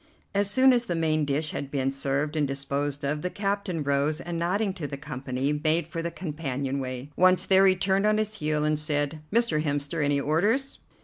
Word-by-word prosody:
As 200 Hz, 0 st, +2 dB
soon 260 Hz, +5 st, +6 dB
as 240 Hz, -1 st, +1 dB
the 175 Hz, -, -2 dB
main 155 Hz, -2 st, +1 dB
dish 145 Hz, +2 st, 0 dB
had 140 Hz, -, -5 dB
been 135 Hz, -1 st, -1 dB
served 140 Hz, +2 st, -1 dB
and 150 Hz, -2 st, +1 dB
disposed 140 Hz, +1 st, -2 dB
of, 150 Hz, +2 st, -1 dB
the 180 Hz, -, -2 dB
captain 195 Hz, -4 st, -2 dB
rose, 140 Hz, +2 st, 0 dB
and, 170 Hz, -1 st, -4 dB
nodding 195 Hz, +4 st, 0 dB
to 170 Hz, -6 st, -5 dB
the 140 Hz, -, -6 dB
company, 135 Hz, 0 st, -3 dB
made 160 Hz, +2 st, +2 dB
for 165 Hz, -, -5 dB
the 170 Hz, -, -2 dB
companion 140 Hz, -6 st, -4 dB
way. 130 Hz, +1 st, -5 dB
Once 185 Hz, 0 st, +4 dB
there 190 Hz, 0 st, +5 dB
he 190 Hz, -, +4 dB
turned 195 Hz, +2 st, +1 dB
on 215 Hz, 0 st, +3 dB
his 215 Hz, 0 st, -1 dB
heel 150 Hz, 0 st, 0 dB
and 155 Hz, 0 st, +1 dB
said: 150 Hz, 0 st, -1 dB
"Mr. 230 Hz, -8 st, +2 dB
Hemster, 145 Hz, +1 st, -1 dB
any 145 Hz, 0 st, +2 dB
orders?" 205 Hz, -, 0 dB
155 Hz, 205 wpm, -26 LUFS, 140-190 Hz, -, soon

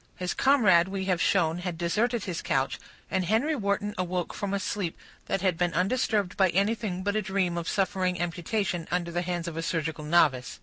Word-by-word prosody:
His 180 Hz, -1 st, -2 dB
comrade, 205 Hz, -11 st, +4 dB
we 190 Hz, 0 st, -3 dB
have 185 Hz, -2 st, +1 dB
shown, 170 Hz, -3 st, +2 dB
had 180 Hz, -2 st, -4 dB
deserted 215 Hz, +7 st, 0 dB
his 180 Hz, -3 st, -4 dB
couch; 135 Hz, -5 st, 0 dB, 0.3 s
and 190 Hz, -, +1 dB
Henry 225 Hz, -, +1 dB
Wharton 205 Hz, -3 st, -1 dB
awoke 180 Hz, -1 st, -2 dB
from 200 Hz, -1 st, -3 dB
a 200 Hz, -, 0 dB
sleep 195 Hz, -4 st, -3 dB, 0.3 s
that 195 Hz, -, -1 dB
had 185 Hz, -4 st, +1 dB
been 175 Hz, -1 st, +1 dB
undisturbed 205 Hz, 0 st, +1 dB
by 190 Hz, -2 st, +4 dB
anything 195 Hz, 0 st, 0 dB
but 205 Hz, +1 st, 0 dB
a 215 Hz, -, +2 dB
dream 190 Hz, -3 st, 0 dB
of 170 Hz, -1 st, -3 dB
suffering 185 Hz, -2 st, 0 dB
amputation 175 Hz, +1 st, -2 dB
under 175 Hz, -1 st, -1 dB
the 175 Hz, +1 st, -1 dB
hands 175 Hz, -1 st, -3 dB
of 165 Hz, -1 st, -5 dB
a -, -, -1 dB
surgical 160 Hz, -2 st, -2 dB
novice. 150 Hz, -5 st, +2 dB
180 Hz, 200 wpm, -27 LUFS, 170-200 Hz, 0.3 s, comrade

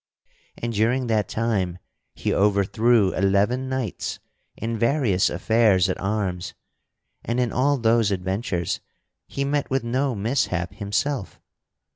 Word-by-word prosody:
And 115 Hz, 0 st, -3 dB
during 120 Hz, +5 st, +1 dB
that 110 Hz, -4 st, 0 dB
time, 100 Hz, -6 st, -1 dB, 0.4 s
he -, -, -1 dB
overthrew 105 Hz, +1 st, +3 dB
eleven 100 Hz, +7 st, +1 dB
knights 130 Hz, -6 st, -3 dB, 0.4 s
in 115 Hz, +1 st, -3 dB
various 115 Hz, -5 st, +2 dB
affairs 95 Hz, -1 st, +3 dB
at 95 Hz, -, -3 dB
arms 95 Hz, -3 st, -2 dB, 0.7 s
and 120 Hz, +2 st, -1 dB
in 120 Hz, -2 st, +1 dB
all 140 Hz, +3 st, +2 dB
those 115 Hz, -2 st, +3 dB
adventures 95 Hz, -2 st, -2 dB, 0.5 s
he 140 Hz, -, -3 dB
met 145 Hz, 0 st, -1 dB
with 135 Hz, -1 st, 0 dB
no 130 Hz, +2 st, 0 dB
mishap 100 Hz, -5 st, -1 dB
himself. 105 Hz, +4 st, -2 dB
110 Hz, 120 wpm, -24 LUFS, 95-125 Hz, 0.7 s, overthrew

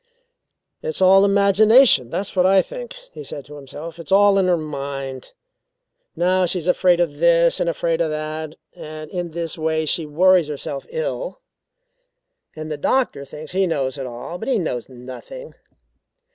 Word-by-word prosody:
"It's 475 Hz, -1 st, -4 dB
all 190 Hz, +1 st, +6 dB
imagination; 200 Hz, -, +5 dB
that's 200 Hz, +8 st, -4 dB
what 180 Hz, 0 st, +4 dB
I 190 Hz, 0 st, +5 dB
think," -, -, -8 dB, 0.2 s
he 450 Hz, -, -8 dB
said 145 Hz, -, -8 dB
to 150 Hz, +3 st, -12 dB
himself. 150 Hz, +4 st, -9 dB
"It's 170 Hz, -, -10 dB
all 200 Hz, 0 st, +5 dB
in 190 Hz, -, +2 dB
her 180 Hz, -1 st, +3 dB
mind. 140 Hz, -3 st, -6 dB, 0.8 s
Now 185 Hz, +1 st, +2 dB
she's 175 Hz, -1 st, -1 dB
afraid 180 Hz, -1 st, +3 dB
of 160 Hz, -4 st, 0 dB
this 170 Hz, 0 st, +4 dB
and 170 Hz, -, +1 dB
afraid 165 Hz, 0 st, -1 dB
of 165 Hz, -, +1 dB
that, 155 Hz, 0 st, -5 dB, 0.2 s
and 155 Hz, 0 st, -9 dB
in 175 Hz, -2 st, -3 dB
this 165 Hz, 0 st, -5 dB
way 160 Hz, 0 st, 0 dB
she 155 Hz, +1 st, -1 dB
worries 180 Hz, +2 st, +4 dB
herself 145 Hz, -1 st, -6 dB
ill. -, -, -4 dB, 1.1 s
"And 155 Hz, 0 st, -7 dB
the 150 Hz, -, -3 dB
doctor 145 Hz, -, 0 dB
thinks 150 Hz, +2 st, -9 dB
he 190 Hz, +1 st, +1 dB
knows 140 Hz, -4 st, -2 dB
it 135 Hz, -, -4 dB
all, 125 Hz, +9 st, -7 dB
but -, -, -6 dB
he 260 Hz, -3 st, +2 dB
knows 130 Hz, -, -3 dB
nothing. 130 Hz, -, -10 dB
170 Hz, 165 wpm, -21 LUFS, 150-190 Hz, 1.1 s, all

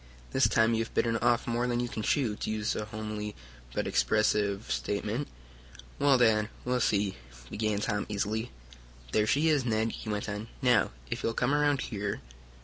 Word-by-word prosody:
This 130 Hz, -3 st, +4 dB
time 115 Hz, +1 st, +3 dB
you 115 Hz, 0 st, +1 dB
have 110 Hz, -, -11 dB
bitten 115 Hz, -1 st, +2 dB
off 120 Hz, 0 st, +2 dB
more 120 Hz, +1 st, 0 dB
than 120 Hz, -1 st, 0 dB
you 120 Hz, -, 0 dB
can 110 Hz, -, -4 dB
chew, 115 Hz, -1 st, +1 dB
to -, -, -4 dB
use 110 Hz, 0 st, -1 dB
a 105 Hz, -, -2 dB
homely 105 Hz, -1 st, -5 dB, 0.4 s
but -, -, -1 dB
expressive 105 Hz, -1 st, +1 dB
statement." 105 Hz, -, -1 dB, 0.7 s
"Well, 140 Hz, -2 st, +5 dB
Dad, 110 Hz, -3 st, +3 dB, 0.2 s
we'll 125 Hz, 0 st, +1 dB
see," 100 Hz, -, +1 dB, 0.3 s
began 110 Hz, -1 st, 0 dB
Tom 105 Hz, -2 st, -1 dB
easily. 105 Hz, +3 st, -1 dB, 0.6 s
"There 105 Hz, 0 st, +2 dB
she 150 Hz, +7 st, +3 dB
is, 150 Hz, -4 st, +3 dB
Ned," 110 Hz, -1 st, +1 dB
he 110 Hz, -, -7 dB
went 105 Hz, -1 st, -2 dB
on. 105 Hz, +1 st, -4 dB
"Now, 125 Hz, -5 st, +4 dB, 0.2 s
if -, -, -2 dB
you'll 115 Hz, -, -1 dB
come 125 Hz, +3 st, +1 dB
around 145 Hz, -2 st, +3 dB
here..." 100 Hz, -2 st, -3 dB
110 Hz, 180 wpm, -30 LUFS, 105-120 Hz, 0.7 s, Well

